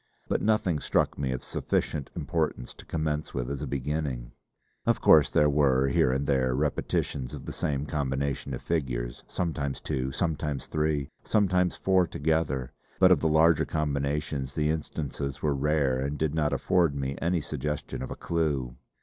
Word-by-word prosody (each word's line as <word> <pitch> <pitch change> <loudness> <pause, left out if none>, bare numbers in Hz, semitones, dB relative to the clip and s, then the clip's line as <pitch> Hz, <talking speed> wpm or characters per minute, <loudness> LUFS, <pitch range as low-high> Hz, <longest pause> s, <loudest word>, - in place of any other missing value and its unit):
But - - 0
nothing 105 -7 +2
struck - - +1
me 65 -2 0
of 65 - -3
sufficient 70 -3 -1
importance 80 -7 -2
to - - -15
commence 75 -1 -2
with 60 +1 -2
as 70 -1 -4
a 75 - -3
beginning. 70 -2 -3 0.5
Of - - +2
course 75 -3 +6
there 75 - +4
were 70 -2 +3
here 65 - +3
and 70 +2 0
there 65 -3 +2
repetitions 70 -2 -1
of - - -9
the - - -5
same 70 -1 -1
combination 70 -1 -2
of - - -9
figures, 60 -7 -2
sometimes 75 -6 -2
two, 65 0 -2
sometimes 75 -2 -2
three, 75 -2 -1
sometimes 90 -4 +2
four 95 -2 +3
together; 75 -5 0 0.3
but 95 -1 +6
of 90 - +6
the 80 - +1
larger 80 +1 +5
combinations 70 -2 -2
the 75 -1 +2
instances 70 -3 -4
were 75 -2 +2
rare 70 -2 +1
and 70 +2 -2
did 75 -1 0
not 75 -2 +1
afford 85 -6 +2
me 70 0 -2
any 85 +1 +1
suggestion 75 0 -4
of 65 - -4
a - - -5
clue! 75 -7 -1
75 Hz, 165 wpm, -28 LUFS, 65-80 Hz, 0.5 s, course